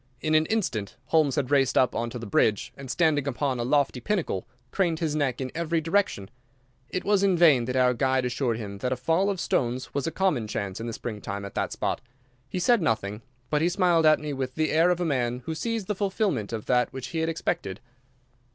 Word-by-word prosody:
In 155 +2 -1
an 155 0 +4
instant 155 - -1
Holmes 155 -4 +3
had 145 -3 -1
raced 135 -2 +3
up 130 - +4
on 115 0 -2
to 125 - -6
the 115 - -7
ridge, 105 0 +1
and, 135 -1 -9
standing 150 -2 +2
upon 135 -1 -1
a - - 0
lofty 140 0 +1
pinnacle, 175 - -2 0.2
craned 175 -5 +1
his 155 -2 -1
neck 140 -5 0
in 130 -1 -4
every 165 0 0
direction. 160 - 0 0.6
It 185 - -3
was 205 -1 +3
in 195 -3 +3
vain 150 -8 +5
that 125 +1 -3
our 125 -1 +4
guide 130 +1 +1
assured 120 -2 -1
him 100 -3 -7
that 125 +4 -2
a - - +2
fall 165 - +1
of 195 -3 -2
stones 125 -3 -1
was 140 +1 -1
a - - -1
common 165 - 0
chance 100 -3 -4
in 115 - -4
the 115 - -4
spring 110 -2 -6
time 100 0 -5
at 100 - -8
that - - -2
spot. - - -2 0.5
He - - -4
said 220 +5 +3
nothing, 110 -7 -1 0.3
but 150 -1 +2
he 170 - +3
smiled 175 -3 +3
at 155 - +5
me 150 -1 -4
with 130 -1 -4
the 155 -1 0
air 165 +3 +4
of 180 -1 +1
a 175 - 0
man 125 -4 -1
who 160 - -2
sees 225 +4 -2
the 210 - -1
fulfillment 190 - -1
of 110 -2 -4
that 125 -1 +2
which 130 -1 -6
he 165 - -3
had 160 0 0
expected. 100 - -2
140 Hz, 235 wpm, -26 LUFS, 120-165 Hz, 0.6 s, vain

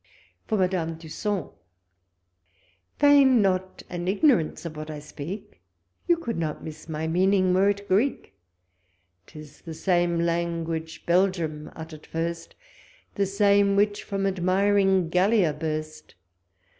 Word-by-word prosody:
For 220 - 0
Madame 180 -4 0
Dusson. 180 +5 -4 1.5
Feign 280 -4 +6
not 185 -2 0
an 175 0 -5
igiun 240 - +4
ance 160 +2 -6
of 160 -2 -6
what 155 0 -7
I 155 - -5
speaic; 150 - -8 0.5
You 345 - +4
could 235 - -4
not 155 -2 -3
miss 160 +1 -9
my 160 0 -3
meaning 185 +2 +2
were 195 +2 +4
it 200 0 -3
Greek: 215 +9 0 0.9
•Tis 150 -2 -13
the 165 -2 -7
same 175 0 +1
language 165 -1 -2
Belgium 170 -4 0
utter'd 160 -1 -10
first, 165 +1 -4 0.6
The 200 -1 0
same 200 0 +3
wliich 205 0 +2
from 195 -1 -3
admiring 190 0 +2
Gallia 185 -1 +3
burst. 155 0 -5
180 Hz, 125 wpm, -25 LUFS, 160-200 Hz, 1.5 s, Feign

